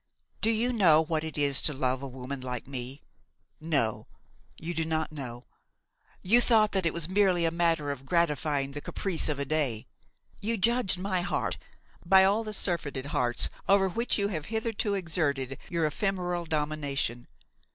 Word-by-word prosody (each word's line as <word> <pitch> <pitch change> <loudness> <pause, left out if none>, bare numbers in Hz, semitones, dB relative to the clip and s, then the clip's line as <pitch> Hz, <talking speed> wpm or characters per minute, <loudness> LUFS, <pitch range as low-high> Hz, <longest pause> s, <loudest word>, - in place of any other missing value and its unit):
"Do 225 - +3
you 230 +3 +1
know 170 -9 +5
what 160 0 -1
it 160 -1 -5
is 140 -2 +2
to 150 - +2
love 130 -1 0
a 140 - -5
woman 130 +1 -7
like 125 -1 -5
me? 130 +1 -7 0.6
No, 140 -9 -1 0.5
you 170 +2 -5
do 165 - 0
not 160 -1 -1
know. 125 -5 -7 0.8
You 230 +6 +5
thought 220 -3 +4
that 190 -3 +1
it - - +1
was 170 -2 +1
merely 185 -3 +2
a 165 - +1
matter 165 -3 +1
of 135 -1 -8
gratifying 150 -4 0
the 145 +1 -6
caprice 180 -2 -1
of 150 - -1
a 140 - -2
day. 135 -7 -1 0.5
You 225 +3 -2
judged 230 -1 +2
my 185 -1 -1
heart 175 - -2 0.4
by 190 +2 +6
all 205 +4 +3
the 215 - -5
surfeited 160 -9 0
hearts 120 -1 +3 0.2
over 195 -1 +5
which 230 +6 -1
you 200 -1 0
have 155 -7 -4
hitherto 220 -2 -2
exerted 145 -8 -1
your 170 -2 0
ephemeral 180 +1 -1
domination. 150 -6 -2
160 Hz, 170 wpm, -28 LUFS, 140-195 Hz, 0.8 s, by